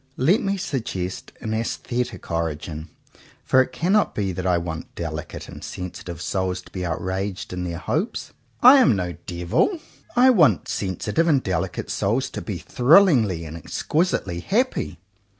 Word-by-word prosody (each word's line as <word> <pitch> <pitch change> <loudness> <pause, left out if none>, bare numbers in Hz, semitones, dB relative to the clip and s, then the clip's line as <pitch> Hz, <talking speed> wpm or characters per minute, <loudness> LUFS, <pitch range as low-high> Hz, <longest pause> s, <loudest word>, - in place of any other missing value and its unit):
Let 170 - +3
me 200 -1 0
suggest 110 - -4
an 110 - -3
aesthetic 115 -2 -3
origin; 80 0 -3 0.5
for 130 - +5
it 130 - -2
cannot 195 +5 +1
be 100 -2 -1
that 95 +1 -3
I 90 -1 +3
want 85 -1 -5
delicate 80 -3 -5
and - - -10
sensitive 90 -1 -6
souls 95 -1 -1
to - - -18
be 90 - -4
outraged 95 +3 -3
in 90 0 -3
their 85 -1 -4
hopes. 160 - -2 0.3
I 255 +3 +10
am 135 - +5
no 90 -2 -2 0.2
devil. 90 - +1 0.4
I 255 +1 +7
want 150 - +4
sensitive 100 - -1
and 140 -5 +3
delicate 95 -2 -2
souls 115 +7 0
to - - -5
be 100 -5 -4
thrillingly 120 - +4
and 80 +1 -7
ex 85 - -6
quisitely 125 - 0
happy. 245 - 0
95 Hz, 155 wpm, -23 LUFS, -, 0.5 s, I